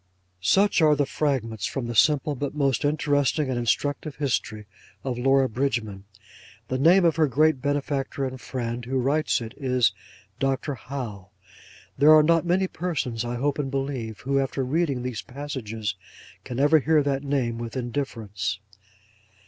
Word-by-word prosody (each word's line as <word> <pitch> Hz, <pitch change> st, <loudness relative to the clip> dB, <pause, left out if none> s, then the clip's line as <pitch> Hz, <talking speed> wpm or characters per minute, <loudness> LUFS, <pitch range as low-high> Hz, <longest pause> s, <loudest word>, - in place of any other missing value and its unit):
Such 195 Hz, -, +3 dB
are 155 Hz, -, +6 dB
a -, -, +2 dB
few 145 Hz, -, +2 dB
fragments 115 Hz, -9 st, -1 dB
from 135 Hz, -, -4 dB
the 120 Hz, -, -4 dB
simple 145 Hz, +5 st, +3 dB
but 140 Hz, +1 st, -4 dB
most 135 Hz, -5 st, +1 dB
interesting 145 Hz, -1 st, +1 dB
and 120 Hz, -, -1 dB
instructive 145 Hz, +5 st, -1 dB
history 115 Hz, -6 st, -2 dB, 0.4 s
of 125 Hz, -3 st, -3 dB
Laura 135 Hz, +1 st, +3 dB
Bridgman. 110 Hz, -6 st, -2 dB, 0.6 s
The 130 Hz, -, -1 dB
name 175 Hz, +6 st, +5 dB
of 165 Hz, -1 st, +3 dB
her 155 Hz, -2 st, +4 dB
great 150 Hz, +1 st, +2 dB
benefactor 140 Hz, 0 st, -1 dB
and 130 Hz, -1 st, -6 dB
friend, 120 Hz, -2 st, -4 dB
who 130 Hz, +3 st, -2 dB
writes 140 Hz, +2 st, +1 dB
it, 115 Hz, -1 st, -7 dB
is 125 Hz, -7 st, +2 dB, 0.5 s
Dr. 135 Hz, +2 st, -1 dB
Howe. 115 Hz, -7 st, -7 dB, 0.7 s
There 150 Hz, +2 st, +8 dB
are 155 Hz, -, +7 dB
not 165 Hz, +2 st, +3 dB
many 185 Hz, +2 st, +2 dB
persons, 145 Hz, -11 st, -3 dB
I 120 Hz, 0 st, -3 dB
hope 140 Hz, +4 st, -1 dB
and 140 Hz, -2 st, -1 dB
believe, 135 Hz, -5 st, -4 dB
who, 135 Hz, +1 st, +1 dB
after 135 Hz, 0 st, -1 dB
reading 140 Hz, -2 st, 0 dB
these 125 Hz, -4 st, -4 dB
passages, 125 Hz, -7 st, -5 dB, 0.5 s
can 125 Hz, 0 st, -5 dB
ever 150 Hz, +3 st, +5 dB
hear 155 Hz, +1 st, +3 dB
that 140 Hz, -1 st, 0 dB
name 130 Hz, -5 st, -1 dB
with 120 Hz, +2 st, -5 dB
indifference. 110 Hz, -6 st, -3 dB
135 Hz, 160 wpm, -25 LUFS, 120-145 Hz, 0.7 s, There